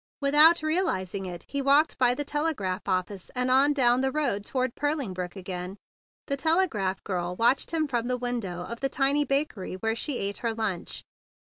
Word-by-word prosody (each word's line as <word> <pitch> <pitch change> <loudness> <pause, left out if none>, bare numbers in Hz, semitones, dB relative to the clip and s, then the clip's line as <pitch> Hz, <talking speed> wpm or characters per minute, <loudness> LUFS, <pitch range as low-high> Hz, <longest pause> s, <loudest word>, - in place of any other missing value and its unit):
Without 300 +4 +5
realizing 200 - -1
it 175 -2 -8
he 280 - -2
walked 285 +3 +3
by 245 -1 +4
the 290 - -3
telegraph 290 - -2
office 185 +1 -2
and 250 0 +1
on 275 +3 +5
down 250 -3 +3
the 265 0 +1
road 260 -9 0
toward 255 +2 -1
Purling 290 -8 -2
Brook 180 0 -5
again. 185 0 -6 0.5
The 280 - -2
telegraph 275 - +1
girl 180 -2 -3
watched 235 +6 +2
him 320 -2 0
from 240 -3 -1
the 250 0 0
window 230 -8 -3
of 235 +5 -7
the 270 - 0
tiny 280 +2 +2
bakery 275 -10 -1
where 225 +4 -1
she 265 +2 -2
ate 200 0 -3
her 230 -2 -2
lunch. 210 -6 -3
245 Hz, 185 wpm, -27 LUFS, 195-285 Hz, 0.5 s, Without